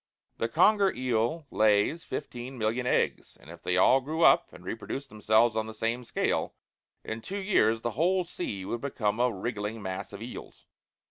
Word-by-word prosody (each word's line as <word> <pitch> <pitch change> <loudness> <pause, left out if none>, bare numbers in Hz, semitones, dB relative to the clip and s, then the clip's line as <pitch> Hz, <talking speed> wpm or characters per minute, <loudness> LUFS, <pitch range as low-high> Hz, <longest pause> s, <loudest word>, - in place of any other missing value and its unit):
The - - +1
conger 205 -3 +4
eel 125 +5 -1
lays 110 - +3
fifteen 125 -4 -6
million 115 +3 -1
eggs, - - 0
and 80 - -13
if 85 -1 -12
they 90 +1 0
all 130 +8 +5
grew 160 +5 -2
up, - - +5
and 90 - -14
reproduced 115 +7 -5
themselves 110 +2 +3
on 110 0 -1
the 110 - -8
same 115 +3 -2
scale, - - -1 0.5
in 110 +1 -5
two 195 - -5
years 190 - +2
the 120 - -2
whole 180 - +2
sea 105 - -5
would 115 +4 -3
become 110 -6 -1
a 125 0 +3
wriggling 105 +1 -4
mass 95 -2 -5
of 100 - -8
eels. 120 - -10
115 Hz, 180 wpm, -28 LUFS, 105-135 Hz, 0.5 s, all